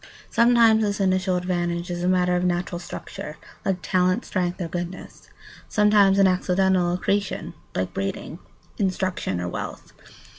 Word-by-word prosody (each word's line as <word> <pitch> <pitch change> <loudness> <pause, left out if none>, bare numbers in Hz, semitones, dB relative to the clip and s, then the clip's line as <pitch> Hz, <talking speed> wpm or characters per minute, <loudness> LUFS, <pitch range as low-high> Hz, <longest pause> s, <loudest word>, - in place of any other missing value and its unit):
Sometimes 235 -2 +5
this 205 -1 0
initial 185 -1 +1
advantage 175 -1 -2
is 175 0 -3
a - - +1
matter 180 -1 +2
of 180 - 0
natural 175 -1 -1
structure, 155 -3 -8 0.3
like 185 -2 -1
talent, 185 +4 +1
strength, 180 -2 -2
or 175 - -2
goodness; 175 +2 -7 0.4
sometimes 210 -2 +4
an 195 - +6
accidental 185 -1 +2
accretion, 200 +2 -1 0.2
like 90 0 -2
breeding, 100 - -4 0.4
instruction, 185 - -1
or 90 - -3
wealth. - - -6
185 Hz, 140 wpm, -24 LUFS, 175-195 Hz, 0.4 s, an